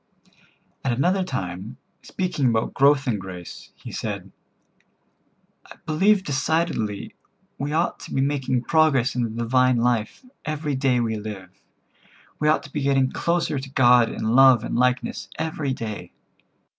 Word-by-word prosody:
At 130 - 0
another 180 +10 +1
time, 95 - -5 0.2
speaking 180 -8 -1
about 115 -1 0
growth 140 0 +3
in 110 -4 0
grace, 90 -3 -9
he - - -10
said: - - -5 1.4
"I - - -13
believe 190 +6 +3
decidedly 145 - -1 0.5
we 140 +2 -2
ought 165 +3 0
to - - -10
be - - -1
making 135 -3 0
progress 150 -6 +3
in 125 - 0
the 115 - -1
divine 125 +3 +2
life 120 - -1 0.2
every 150 -1 -3
day 130 -2 +1
we 110 -2 -1
live. 105 -3 -7 0.9
We 150 - +1
ought 155 - +3
to 145 - -13
be 150 - -2
getting 135 -1 +2
closer 170 -4 0
to 135 +1 -8
God 125 -3 +5
in - - -5
love 130 -3 +6
and - - -3
likeness 125 +1 0
every 160 -3 -2
day." 110 -5 -6
130 Hz, 145 wpm, -23 LUFS, 115-150 Hz, 1.4 s, love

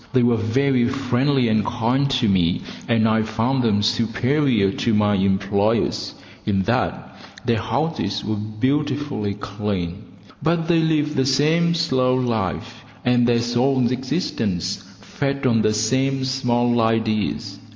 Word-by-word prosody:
They 130 -2 +3
were 120 0 +3
very 120 +3 +1
friendly 135 0 +1
and 110 -1 +2
kind 120 +5 0
to 130 -4 +1
me, 90 -3 +2 0.3
and 115 -1 +2
I 110 0 +2
found 115 +4 0
them 105 -4 +1
superior 115 -1 +1
to 115 +2 0
my 105 0 +2
employers, 100 +3 0 0.3
in 95 -2 0
that - - -2 0.3
their 115 -2 +1
houses 125 -1 -2
were 110 +1 -1
beautifully 130 0 -2
clean; 100 -3 -4 0.4
but 165 +2 0
they 170 -1 +3
lived 155 -2 +1
the 130 0 +1
same 160 +5 +2
slow 130 -6 +1
life, 115 -7 -2 0.2
and 120 -1 +3
their 120 -1 +2
soul's 120 +1 +1
existence 115 - -2 0.2
fed 140 +2 -3
on 115 -3 +3
the 110 - +2
same 130 +5 0
small 120 -2 +1
ideas. 110 -2 -1
120 Hz, 135 wpm, -21 LUFS, 110-135 Hz, 0.4 s, They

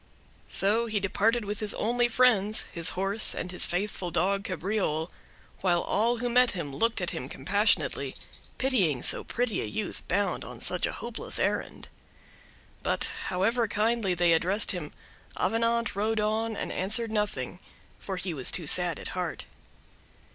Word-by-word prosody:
So 220 +4 +4
he 215 -2 0
departed 210 +4 +1
with 205 +1 -4
his 210 -2 +1
only 240 +2 +1
friends—his 215 -7 +3
horse 195 +3 +4
and 180 - -4
his 180 - +2
faithful 185 0 -2
dog 190 +4 +1
Cabriole; 185 -3 -2 0.5
while 175 -2 +1
all 235 +4 +1
who 245 +1 -2
met 250 +1 +3
him 150 -7 -5
looked 230 +5 0
at - - 0
him - - -5
compassionately, - - +1 0.4
pitying 195 - +1
so - - +2
pretty 245 -3 -2
a - - -3
youth 215 -3 -4
bound 200 +2 0
on - - -9
such - - 0
a - - -4
hopeless - - -5
errand. - - -2 0.9
But, - - -1
however 225 +6 +1
kindly 210 -2 0
they 175 -1 +4
addressed 185 +6 +2
him, 175 -6 -5 0.5
Avenant 230 -1 0
rode 215 +2 0
on 220 +1 -1
and - - -4
answered 220 +4 0
nothing, 205 - -2 0.4
for 195 - -5
he 180 -1 -3
was 135 -5 0
too 170 - +1
sad 175 +2 +4
at - - -6
heart. 180 -2 -4
205 Hz, 155 wpm, -28 LUFS, 180-225 Hz, 0.9 s, So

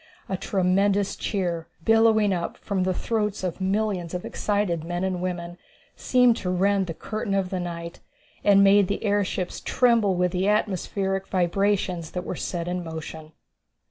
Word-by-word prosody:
A 190 - -2
tremendous 195 +2 +1
cheer, 175 -5 -2 0.2
billowing 225 -2 +4
up 170 -2 -3
from 200 -3 -2
the 185 - +1
throats 210 -3 -1
of 180 0 -3
millions 190 -3 -1
of 180 - -4
excited 200 -6 -1
men 175 +2 -3
and 185 -2 -1
women, 175 -1 -4 0.4
seemed 250 -2 +3
to 180 - -3
rend 195 +1 +2
the 165 - -5
curtain 215 +1 -3
of 190 -2 -1
the 185 - -1
night, 170 -1 -6 0.4
and 200 -1 +6
made 200 0 +5
the 200 - -3
airships 200 -3 -1
tremble 230 -6 +3
with 180 0 +1
the 185 +2 0
atmospheric 195 -2 0
vibrations 185 -2 0
that 180 - -3
were - - -4
set 170 -1 -4
in 180 0 -2
motion. 160 -1 -8
190 Hz, 160 wpm, -25 LUFS, 175-205 Hz, 0.4 s, and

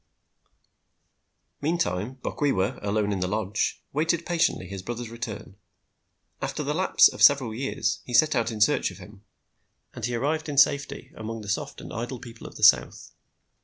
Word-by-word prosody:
Meantime, 130 - -1
Bokwewa, 115 -10 0
alone 105 0 0
in 100 - -1
the 90 - -1
lodge, 105 +1 -2
waited 165 +3 0
patiently 170 - +1
his 95 +1 -7
brother's 120 +3 -6
return. 115 -4 -7 0.8
After - - -3
the - - -1
lapse - - +5
of - - -7
several 135 -6 +5
years 135 +4 -2
he 120 - -4
set 155 +3 +5
out 115 -3 0
in 110 -2 -6
search 145 +8 +3
of 90 - -12
him, 100 +2 -14 0.7
and 120 - -9
he 120 +1 -1
arrived 155 +6 -1
in 145 - -4
safety 140 +1 +2
among 110 +1 -6
the 105 - -8
soft 100 - -3
and - - -9
idle 120 +2 -4
people 115 -1 -11
of - - -13
the - - -7
South. - - +4
115 Hz, 165 wpm, -26 LUFS, 105-140 Hz, 0.8 s, lapse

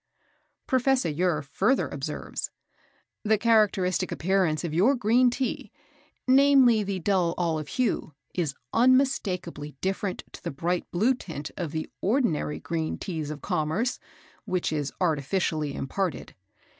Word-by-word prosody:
Professor 260 -6 +2
Ure 155 0 0
further 200 - +1
observes: 145 +2 -5 0.7
"The 220 0 +3
characteristic 210 -5 +2
appearance 180 -3 +1
of 165 -3 -3
your 210 - +4
green 245 +2 +4
Tea, 255 +1 -3 0.6
namely 260 -4 +6
the 200 -1 -2
dull 180 -2 +1
olive 160 -4 -1
hue, 230 - -1 0.2
is 155 -6 -1 0.2
unmistakably 205 - +1
different 190 0 -2
to - - -12
the - - -2
bright 170 +5 -2
blue 220 +9 +2
tint 160 - -7
of 170 -5 -4
the 160 0 -3
ordinary 200 - +1
green 160 -1 -3
Teas 160 -5 -4
of 150 -1 -7
commerce, 180 +7 -1 0.5
which 180 -3 -1
is 145 -2 -2
artificially 155 -2 0
imparted. 180 +6 -3
180 Hz, 125 wpm, -27 LUFS, 155-230 Hz, 0.7 s, namely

